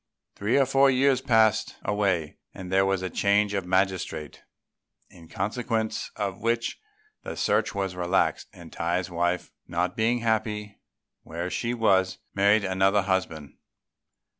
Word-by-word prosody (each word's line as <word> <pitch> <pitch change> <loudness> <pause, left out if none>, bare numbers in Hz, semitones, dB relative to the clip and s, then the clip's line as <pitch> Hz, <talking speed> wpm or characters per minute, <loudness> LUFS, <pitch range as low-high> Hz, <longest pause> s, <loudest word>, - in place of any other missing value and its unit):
Three 105 +6 0
or 135 - +4
four 135 +1 +4
years 130 0 +3
passed 115 -5 +2
away 95 -7 0 0.2
and 95 -1 -8
there 95 0 +3
was 95 -1 0
a 95 - -2
change 100 +1 +2
of 95 -3 -2
magistrate; 95 -5 -1 0.7
in 85 -1 -15
consequence 110 +2 -2
of 100 -3 -4
which 115 +1 -1 0.4
the - - -7
search - - +1
was 95 -2 -2
relaxed, 90 +1 0
and 85 -2 -13
Tai's 85 +2 -2
wife, 85 +1 -1 0.2
not 90 +2 -1
being 115 +2 +1
happy 105 -2 -2 0.4
where 85 +3 -5
she 120 +1 -2
was, 95 -5 +2 0.2
married 100 +1 +3
another 95 +1 +2
husband. 95 -6 -3
100 Hz, 140 wpm, -26 LUFS, 90-110 Hz, 0.7 s, or